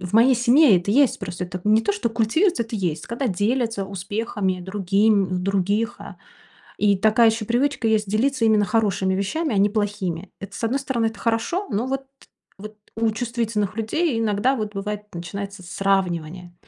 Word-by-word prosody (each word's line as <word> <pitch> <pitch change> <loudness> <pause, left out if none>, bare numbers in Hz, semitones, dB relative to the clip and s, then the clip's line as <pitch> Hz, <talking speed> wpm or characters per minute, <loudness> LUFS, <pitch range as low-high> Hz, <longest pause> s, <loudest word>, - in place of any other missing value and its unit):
В 180 0 -6
моей 245 +4 +6
семье 245 -1 +5
это 180 +3 -4
есть. 275 +1 +3
Просто 180 -3 -6
это 180 +1 -7
не 215 +1 +4
то, 210 -2 +1
что 205 +3 -1
культивируется, 235 - +1
это 225 0 -5
есть. 175 -6 -2
Когда 240 +4 -2
делятся 225 +1 0
успехами 195 0 -3
другим 195 0 +1
других, 200 +4 0
а. - - -10 0.6
И 205 -1 +3
такая 220 +3 +4
ещё 220 0 -2
привычка 245 +1 0
есть- 215 -1 +1
делиться 240 +3 +1
именно 215 -2 +4
хорошими 200 -4 +1
вещами, 220 - -1
а - - 0
не 200 +1 +4
плохими. 205 -4 -3
Это, 200 0 -9
с - - -8
одной 245 +5 +1
стороны, 255 -4 -1
это 225 -2 -7
хорошо. 240 - -1
Но 215 +5 -1
вот 270 +1 -3 0.5
вот 215 +2 -10 0.2
у 225 0 +1
чувствительных 225 -3 -2
людей 235 +6 0
иногда 225 +4 +1
вот 215 -3 -4
бывает, 210 +1 -4
начинается 195 +3 -6
сравнивание. 180 -2 -2
215 Hz, 175 wpm, -22 LUFS, 195-230 Hz, 0.6 s, моей